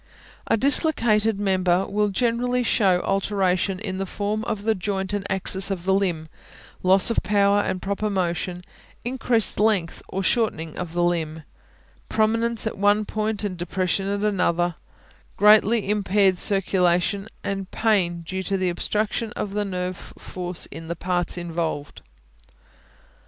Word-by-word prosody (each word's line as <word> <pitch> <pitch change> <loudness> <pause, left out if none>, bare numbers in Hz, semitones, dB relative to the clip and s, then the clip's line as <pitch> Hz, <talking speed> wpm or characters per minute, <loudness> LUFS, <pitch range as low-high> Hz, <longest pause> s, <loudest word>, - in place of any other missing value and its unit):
A - - +2
dislocated 225 -6 +2
member 190 -2 +1
will 210 +1 0
generally 245 +3 0
show 190 -6 +2
alteration 195 -1 0
in 190 -3 -5
the 195 - -3
form 210 +3 -2
of 215 -3 -3
the 220 +1 +2
joint 190 0 -3
and 200 -1 -2
axis 190 0 +1
of 185 -3 -4
the 190 - +2
limb; 175 -5 0 0.5
loss 190 +4 +4
of - - +1
power 200 0 +3
and 185 -2 -2
proper 200 +2 -2
motion; 180 -1 -2 0.4
increased 240 -4 +1
length 205 -6 +1
or 195 - -3
shortening 175 -8 0
of 175 -2 -5
the 175 0 +1
limb; 160 -2 -1 0.7
prominence 230 +1 +1
at 220 - -4
one 205 +1 +3
point 215 0 -2
and 190 -3 -3
depression 185 +2 -1
at 200 0 -2
another; 175 -4 +1 0.6
greatly 210 +1 +5
impaired 200 -2 +2
circulation, 195 0 +3 0.2
and 195 -1 -4
pain 185 -6 +1
due 185 +3 -4
to 195 +1 -1
the 185 -1 0
obstruction 210 +5 -2
of 200 - -4
nerve 185 -3 -4
force 180 -1 -5
in 165 - -9
the 170 - -3
parts 175 +1 -2
involved. 165 -4 -4
195 Hz, 140 wpm, -23 LUFS, 180-210 Hz, 0.7 s, greatly